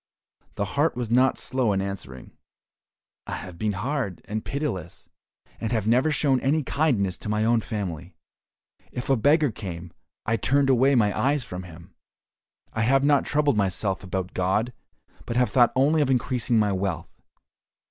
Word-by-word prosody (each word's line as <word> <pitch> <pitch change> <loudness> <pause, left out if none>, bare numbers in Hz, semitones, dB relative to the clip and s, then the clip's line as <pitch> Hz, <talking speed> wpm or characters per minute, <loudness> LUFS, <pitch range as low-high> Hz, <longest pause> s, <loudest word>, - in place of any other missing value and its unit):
The 100 - -1
heart 145 +9 0
was 120 -2 -4
not 130 +2 +4
slow 125 -5 0
in 95 - 0
answering, 95 -10 -6 1.0
"I - - -4
have 90 -2 -9
been 105 -1 0
hard 115 - -3
and 110 +1 -4
pitiless, 95 - -4 0.5
and 115 -1 -3
have 110 -4 0
never 125 +7 +3
shown 140 -3 +2
any 150 +4 +1
kindness 115 - 0
to - - -6
my 105 +1 +1
own 115 0 +3
family. 95 -8 -5 0.8
If 125 +2 -3
a - - +5
beggar 145 +3 +3
came, 85 -5 -7 0.3
I 115 +2 +1
turned 135 +5 +2
away 130 +2 +4
my 105 -4 +2
eyes 135 +4 +1
from 90 -4 -7
him. 85 +1 -13 0.8
I 110 - -1
have 135 +4 +3
not 145 -1 +3
troubled 145 -5 +2
myself 95 0 0
about 95 -1 -4
God, 95 +7 0 0.5
but 115 - -3
have 125 -3 +2
thought 120 -2 +5
only 145 +4 +3
of 140 - +1
increasing 125 -2 +1
my 105 -2 +3
wealth. 95 -3 -4
115 Hz, 165 wpm, -25 LUFS, 95-135 Hz, 1.0 s, a